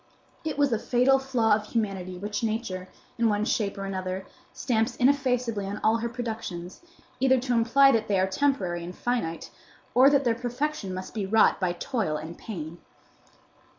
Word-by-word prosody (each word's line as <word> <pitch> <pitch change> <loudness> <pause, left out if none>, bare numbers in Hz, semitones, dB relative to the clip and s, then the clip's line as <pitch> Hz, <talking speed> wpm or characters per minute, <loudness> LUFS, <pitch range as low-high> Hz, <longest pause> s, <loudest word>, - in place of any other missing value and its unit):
It 310 -2 -3
was 285 -2 +3
the 225 - +1
fatal 255 +3 +3
flaw 250 -5 +2
of 210 0 +1
humanity 195 -5 -2
which 205 +2 -3
Nature, 215 -5 -3 0.3
in 230 -1 +3
one 210 0 +1
shape 205 -3 -1
or 195 - -4
another, 190 -1 -4 0.3
stamps 225 -2 0
ineffaceably 250 -6 +1
on 205 +1 -4
all 220 +1 +4
her 235 +1 -3
productions, 220 -7 -6 0.4
either 260 0 +4
to 250 0 -1
imply 240 +4 +5
that 225 -3 +1
they 200 -2 +2
are 190 - +3
temporary 190 -5 0
and 180 +1 -7
finite, 235 -10 -2 0.4
or 260 +3 +7
that 280 -1 +3
their 235 -3 +2
perfection 245 -1 -3
must 185 0 -6
be 205 -4 -3
wrought 220 +2 +4
by 180 -2 0
toil 175 - -2
and 160 +3 -8
pain. 170 -5 -7
220 Hz, 175 wpm, -27 LUFS, 190-250 Hz, 0.4 s, or